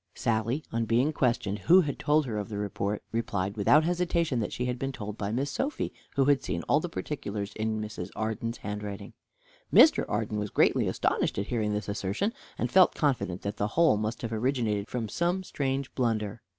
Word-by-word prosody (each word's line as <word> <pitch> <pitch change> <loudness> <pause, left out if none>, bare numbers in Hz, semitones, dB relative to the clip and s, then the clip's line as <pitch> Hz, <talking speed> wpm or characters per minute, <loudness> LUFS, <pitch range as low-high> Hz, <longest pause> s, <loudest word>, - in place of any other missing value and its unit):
Sally, 115 +6 0
on 115 0 0
being 125 +7 +2
questioned 120 -6 0
who 180 - +6
had 145 -5 -3
told 150 0 +3
her 110 -4 -3
of 105 - -5
the 105 - -4
report, 100 0 -2
replied, 100 -4 -2
without 140 +9 +5
hesitation, 170 -5 0
that 105 - -2
she 125 - -2
had 125 0 -2
been 135 0 -2
told 105 -5 -6
by 100 -2 -3
Miss 135 +5 -1
Sophy, 275 - -2 0.2
who 135 - +3
had 140 -1 +4
seen - - -3
all 145 - +3
the 175 - -4
particulars 105 -11 -4
in 110 0 -2
Mrs. 105 -4 -5
Arden's 110 +2 -2
handwriting. 100 0 -6 0.6
Mr. 315 - +7
Arden 105 0 -1
was 105 0 -3
greatly - - +3
astonished - - 0
at 100 - -1
hearing 110 -3 -1
this 105 0 -3
assertion, 100 - -1 0.2
and 120 - -2
felt 185 -1 +6
confident 125 - 0
that 100 +1 -3
the 105 - 0
whole 165 -9 +6
must 110 +3 -3
have 115 -1 -3
originated 110 -3 0
from 120 -3 -3
some 175 - 0
strange 135 -5 -2
blunder. 110 -3 -1
115 Hz, 195 wpm, -28 LUFS, 105-140 Hz, 0.6 s, Mr